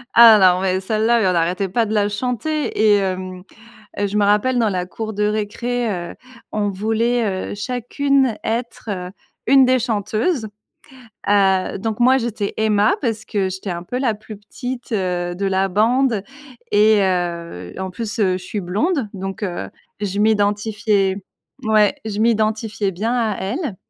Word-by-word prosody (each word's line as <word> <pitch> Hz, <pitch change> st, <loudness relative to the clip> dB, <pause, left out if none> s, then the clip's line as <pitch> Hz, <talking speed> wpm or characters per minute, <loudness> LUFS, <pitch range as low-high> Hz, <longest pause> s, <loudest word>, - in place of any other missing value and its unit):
là 230 Hz, -2 st, +9 dB
là, 185 Hz, -2 st, +5 dB
mais 185 Hz, -1 st, +1 dB
celle-là, 220 Hz, +4 st, +1 dB
on 190 Hz, -4 st, +2 dB
n'arrêtait 180 Hz, +3 st, 0 dB
pas 225 Hz, +5 st, +1 dB
de 215 Hz, -, -3 dB
la 205 Hz, -1 st, +2 dB
chanter 250 Hz, +8 st, -2 dB
et 215 Hz, -1 st, +5 dB
hem 185 Hz, -1 st, -4 dB, 0.5 s
et 205 Hz, -, 0 dB
je 205 Hz, -, -3 dB
me 210 Hz, -, +3 dB
rappelle 210 Hz, +5 st, +2 dB
dans 225 Hz, -2 st, +2 dB
la 180 Hz, -2 st, -1 dB
cour 220 Hz, +3 st, -5 dB
de 210 Hz, -, -2 dB
récré, 220 Hz, +3 st, -1 dB, 0.2 s
heu, -, -, -10 dB, 0.4 s
on 205 Hz, -1 st, -1 dB
voulait, 220 Hz, 0 st, -1 dB
heu, -, -, -4 dB
chacune 250 Hz, +3 st, 0 dB
être, 230 Hz, 0 st, -4 dB
heu, 180 Hz, -2 st, -4 dB, 0.4 s
une 270 Hz, +1 st, +6 dB
des 255 Hz, 0 st, +3 dB
chanteuses. 220 Hz, -, -1 dB, 0.8 s
Heu, 195 Hz, -2 st, +3 dB
donc 220 Hz, +2 st, -3 dB
moi 255 Hz, +2 st, +5 dB
j'étais 230 Hz, -5 st, -2 dB
Emma 215 Hz, 0 st, +3 dB
parce 225 Hz, -4 st, -2 dB
que 195 Hz, -3 st, -1 dB
j'étais 190 Hz, +1 st, -5 dB
un 170 Hz, 0 st, -4 dB
peu 245 Hz, +8 st, -4 dB
la 250 Hz, -5 st, +1 dB
plus 215 Hz, 0 st, -11 dB
petite, 245 Hz, +4 st, -7 dB
heu, 180 Hz, -3 st, -1 dB
de 200 Hz, -, -4 dB
la 195 Hz, 0 st, +1 dB
bande 225 Hz, +3 st, +2 dB, 0.5 s
et 210 Hz, 0 st, +5 dB
heu, 170 Hz, -, -2 dB
en 190 Hz, 0 st, -4 dB
plus, 225 Hz, +3 st, -5 dB
heu, 190 Hz, -3 st, +3 dB
je 180 Hz, -, -12 dB
suis 205 Hz, +3 st, -4 dB
blonde 240 Hz, -, 0 dB
donc, 195 Hz, +1 st, -6 dB
heu, 180 Hz, -4 st, -3 dB, 0.3 s
je 200 Hz, -1 st, -2 dB
m'identifiais 205 Hz, -2 st, +1 dB, 0.4 s
ouais, 215 Hz, +4 st, +3 dB
je 215 Hz, -1 st, -3 dB
m'identifiais 220 Hz, -2 st, 0 dB
bien 215 Hz, +7 st, -2 dB
à 225 Hz, -5 st, 0 dB
elle 225 Hz, -, -3 dB
210 Hz, 165 wpm, -20 LUFS, 190-230 Hz, 0.8 s, là